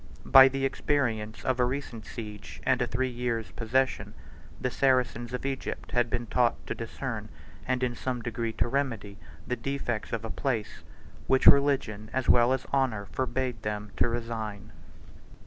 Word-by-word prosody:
By 135 0 +9
the 135 0 -1
experience 120 -6 -1
of 130 -1 +1
a - - +5
recent 125 -3 -4
siege, 105 -3 -8
and 130 -1 +3
a 125 - +1
three 130 +2 0
years' 120 -5 -2
possession, 130 +7 0 0.4
the 125 - -1
Saracens 125 -3 +1
of 125 +1 -4
Egypt 135 -1 -4
had 120 -1 +2
been 120 +1 -2
taught 120 +1 +2
to - - -3
discern, - - -5 0.4
and 130 0 0
in 125 -1 +1
some 125 +1 -3
degree 115 0 -2
to - - 0
remedy, 115 -7 -2 0.3
the 125 - -1
defects 120 -2 -3
of 115 -1 -3
a 115 - -5
place, 120 -7 -2 0.5
which 130 0 +3
religion 130 -7 +4
as 130 -1 -1
well 120 +1 +6
as 130 -1 0
honor 125 -7 +1
forbade 125 +4 -2
them 105 -1 -4
to - - +3
resign. 110 -3 -4
120 Hz, 165 wpm, -28 LUFS, 110-130 Hz, 0.5 s, By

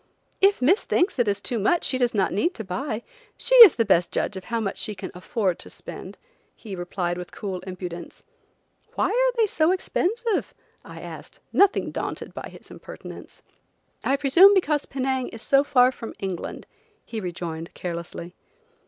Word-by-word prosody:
"If 395 -8 +4
Miss 370 - +4
thinks 355 -6 +1
it 240 - +3
is 200 -1 0
too 240 - -2
much 330 - +2
she 255 - 0
does 245 -2 +1
not 195 -2 +1
need 340 - 0
to 220 - -5
buy. 220 +4 -4 0.3
She - - -1
is 455 -9 +11
the 230 - +1
best 180 -3 +2
judge - - -1
of 190 -1 -8
how 230 0 -2
much 200 -3 -3
she 210 -2 -3
can 190 - -7
afford 185 0 -2
to - - -8
spend," - - -9 0.4
he 205 -4 -8
replied 175 0 -3
with 180 - -8
cool 190 -3 -5
impudence. 175 -2 -7 0.7
"Why - - +1
are - - +2
they 455 - +4
so 330 -4 +2
expensive?" 400 +3 -1 0.3
I - - -11
asked, - - -10
nothing 400 0 +3
daunted - - -5
by - - -7
his - - -14
impertinence. - - -11 0.6
"I 275 - +1
presume 340 +9 +6
because 300 -6 +1
Penang 265 -1 -1
is 225 - -4
so 275 0 +4
far 255 -3 +4
from 230 -3 -9
England," 190 -3 -5 0.4
he 225 - -5
rejoined, 170 -2 -5
carelessly. 170 0 -6
230 Hz, 175 wpm, -24 LUFS, -, 0.7 s, is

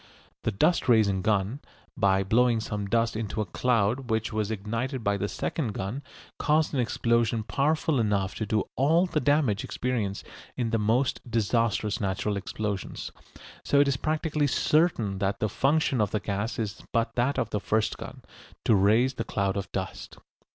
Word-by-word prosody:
The 115 - -1
dust 155 - +2
raising 105 -5 +4
gun, 105 +5 0 0.4
by 95 -5 +3
blowing 115 +3 +3
some 105 -2 -4
dust 115 +2 +1
into 110 0 -3
a 105 - 0
cloud 120 +4 0
which 110 0 -1
was 110 -1 -1
ignited 115 +5 -3
by 100 -1 +1
the 100 +1 -2
second 120 +1 -3
gun, 100 +9 -4 0.4
caused 155 +1 +2
an 135 - 0
explosion 115 -2 +1
powerful 150 +3 +1
enough 100 -4 0
to 110 - -3
do 105 0 +1
all 160 +7 +3
the 165 -4 -1
damage 145 -9 +2
experienced 115 -6 -2 0.3
in 115 -3 -1
the 115 - +1
most 115 +5 +1
disastrous 115 -1 0
natural 100 +1 -1
explosions. 100 0 -4 0.5
So 140 - +3
it 140 - +5
is 140 - +2
practically 155 0 0
certain 130 - +1
that 100 0 -1
the 110 - +1
function 135 +2 +1
of 105 - +1
the 105 - -1
gas 100 +3 -3
is 110 -1 -4
but 115 -1 0
that 125 +4 0
of 115 -4 -1
the 105 - 0
first 110 +1 0
gun, - - -9 0.4
to - - +4
raise 110 +6 +4
the 120 - -3
cloud 100 -3 -1
of 100 -3 -4
dust. - - -5
115 Hz, 170 wpm, -27 LUFS, 100-130 Hz, 0.5 s, it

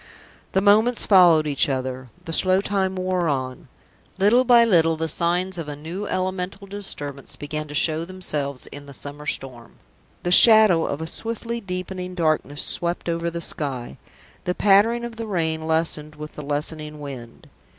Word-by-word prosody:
The 190 - +2
moments 215 +4 +3
followed 175 -6 +5
each 145 -1 +2
other, 130 -1 -4 0.2
the 165 - -4
slow 185 +2 +6
time 195 -2 -1
wore 185 -2 -1
on. 130 -2 -4 0.5
Little 210 +6 +4
by 240 -2 +6
little 165 -6 +3
the 160 +1 -2
signs 175 +3 0
of 155 -3 -6
a 145 - -5
new 170 +8 -6
elemental 185 +1 -3
disturbance 145 -9 -6
began 150 +1 -5
to 145 - -8
show 160 +1 +1
themselves 150 -7 -3
in 145 0 -11
the 140 - -10
summer 145 +2 -7
storm. 125 -5 -4 0.5
The 175 - -1
shadow 215 -4 +7
of 140 - -4
a - - -3
swiftly 230 +6 -3
deepening 185 -1 -6
darkness 155 -3 0
swept 175 0 -3
over 170 0 -1
the 170 0 -6
sky. 130 - -3 0.5
The 180 - -1
pattering 220 +4 +3
of 235 -1 -8
the 225 -1 -5
rain 160 -5 -2
lessened 160 -2 -1
with 150 0 -9
the - - -8
lessening 150 +1 -5
wind. 130 -5 -10
165 Hz, 165 wpm, -22 LUFS, 150-190 Hz, 0.5 s, shadow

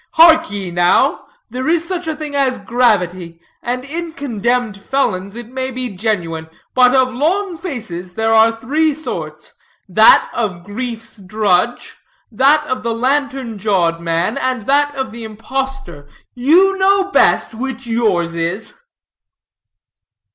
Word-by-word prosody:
Hark 325 -4 +6
ye, 200 -3 -5
now: 175 +1 +2 0.2
there 255 +3 -4
is 335 +1 +1
such 360 -2 -4
a 315 - -2
thing 300 -1 -7
as 270 -2 +1
gravity, 185 -6 0 0.2
and 250 +2 -3
in 330 +3 -5
condemned 245 -5 -1
felons 200 -6 -1
it 240 -1 -8
may 260 +1 -4
be 255 -5 -5
genuine; 170 -6 -2 0.2
but 250 0 +5
of 255 -1 +2
long 350 +8 0
faces 220 - -7
there 225 0 +1
are 225 +1 +4
three 300 +5 +1
sorts; 315 - -6 0.3
that - - +6
of 190 -7 -3
grief's 230 +3 -6
drudge, 205 +2 -1 0.3
that 285 +7 +3
of 255 -3 -3
the 230 -1 -2
lantern 265 -2 -1
jawed 175 -5 +1
man, 170 +5 -1
and 255 -4 -2
that 285 +2 +2
of 265 -3 -3
the 230 +1 -9
impostor. 225 - -5 0.3
You 360 +10 +3
know 390 0 +2
best - - +3
which 260 +2 -5
yours 210 -8 0
is." 170 +6 -3
240 Hz, 140 wpm, -17 LUFS, 200-280 Hz, 0.3 s, Hark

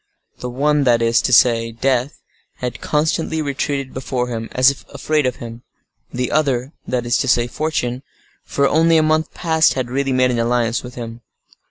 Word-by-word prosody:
The 125 - -5
one—that 135 -2 +2
is 115 0 +3
to - - -1
say, 115 -1 +4
death—had 125 0 -4
constantly 160 +1 0
retreated 140 -2 -2
before 125 -1 -3
him, 115 -1 -5
as 130 +2 +5
if 140 - -11
afraid 150 -3 0
of 125 - -2
him; 115 0 -9 0.5
the 125 0 -2
other—that 130 -3 -1
is 120 -1 +2
to 135 - -1
say, 120 -1 +3
fortune—for 140 0 -3
only 165 +2 +4
a 155 - +4
month 155 0 +1
past 160 -2 +2
had 125 -2 -3
really 135 +1 0
made 130 -1 +2
an 120 - -1
alliance 115 0 0
with 125 0 -10
him. 115 -1 -7
130 Hz, 165 wpm, -19 LUFS, 120-145 Hz, 0.5 s, as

